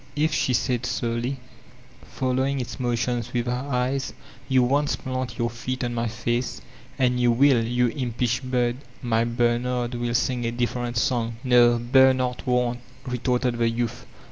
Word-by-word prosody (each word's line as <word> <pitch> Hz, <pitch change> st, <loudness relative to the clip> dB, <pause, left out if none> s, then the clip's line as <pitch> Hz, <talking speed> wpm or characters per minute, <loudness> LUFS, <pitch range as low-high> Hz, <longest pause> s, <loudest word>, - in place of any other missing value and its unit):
'If," 150 Hz, 0 st, +1 dB
she 130 Hz, -, +1 dB
said 125 Hz, 0 st, 0 dB
slowly, 120 Hz, +1 st, -2 dB, 0.6 s
following 130 Hz, +1 st, -1 dB
its 120 Hz, -5 st, -5 dB
motions 120 Hz, -1 st, -1 dB
with 120 Hz, -1 st, 0 dB
her 125 Hz, +3 st, -2 dB
eyes, 130 Hz, +1 st, -1 dB, 0.4 s
''you 130 Hz, -1 st, +4 dB
once 145 Hz, +4 st, +2 dB
plant 130 Hz, -2 st, -4 dB
your 120 Hz, -2 st, 0 dB
feet 130 Hz, +2 st, -4 dB
on 120 Hz, 0 st, -2 dB
my 115 Hz, 0 st, -1 dB
face, 120 Hz, +2 st, -2 dB, 0.4 s
and 125 Hz, -1 st, +2 dB
you 120 Hz, -1 st, +4 dB
will, 125 Hz, -1 st, +4 dB
you 120 Hz, +2 st, +1 dB
inqnsh 120 Hz, -3 st, -1 dB
bird— 125 Hz, -2 st, 0 dB, 0.3 s
my 115 Hz, -2 st, +2 dB
Bernard 120 Hz, +1 st, 0 dB
will 120 Hz, 0 st, -2 dB
sing 125 Hz, 0 st, 0 dB
a 115 Hz, -, -1 dB
different 120 Hz, 0 st, -2 dB
song." 115 Hz, -1 st, 0 dB
''No, 120 Hz, -2 st, +5 dB
Bernard 130 Hz, +1 st, +3 dB
won't," 125 Hz, -1 st, +1 dB, 0.3 s
retorted 125 Hz, -1 st, 0 dB
the 115 Hz, -1 st, +3 dB
youth. 120 Hz, +1 st, -3 dB
125 Hz, 155 wpm, -24 LUFS, 120-130 Hz, 0.6 s, No